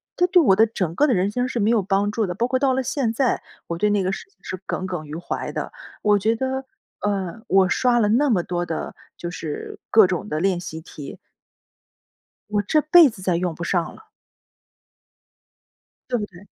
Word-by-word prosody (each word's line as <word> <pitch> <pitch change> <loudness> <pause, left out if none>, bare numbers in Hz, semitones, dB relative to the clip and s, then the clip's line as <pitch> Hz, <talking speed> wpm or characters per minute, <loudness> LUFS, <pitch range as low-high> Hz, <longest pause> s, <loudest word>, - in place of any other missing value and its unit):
这 360 - +3
对 360 0 +5
我 195 -11 +5
的 220 +3 +6
整 185 -7 -2
个 295 - +4
的 260 - +3
人 195 +1 +1
生 250 +3 -1
是 245 - -3
没 210 0 +2
有 230 -3 +3
帮 195 +2 +1
助 220 0 0
的， 180 - -3
包 240 - 0
括 255 0 0
到 270 -1 +2
了 260 +1 0
现 250 -2 -1
在 255 +1 +1 0.3
我 170 - -3
对 210 +4 +2
那 205 -2 +2
个 185 - 0
事 195 - -7
情 395 - -36
是 185 - -5
耿 185 - -3
耿 180 -4 -4
于 150 - -7
怀 175 - -4
的。 - - -4 0.3
我 210 -1 +4
觉 220 +3 +1
得， 265 +2 -2 0.4
呃， 200 -1 -2
我 190 0 +4
刷 245 +4 +3
了 215 - +3
那 270 +7 +3
么 205 -8 +3
多 175 0 -2
的 165 -2 -4 0.2
就 175 - -5
是 160 -3 -6
各 220 -3 +7
种 185 +3 -3
的 155 - -1
练 185 0 +1
习 160 -2 -7
题 145 -3 -10 1.3
我 210 -1 +1
这 305 +10 +2
辈 310 0 +7
子 220 -5 -12
再 185 -2 +1
用 175 0 -1
不 165 - -12
上 175 -1 -1
了。 440 - -17 2.0
对 245 - +1
不 210 - -3
对？ 185 +1 -16
205 Hz, 230 characters per minute, -23 LUFS, 180-245 Hz, 2.0 s, 各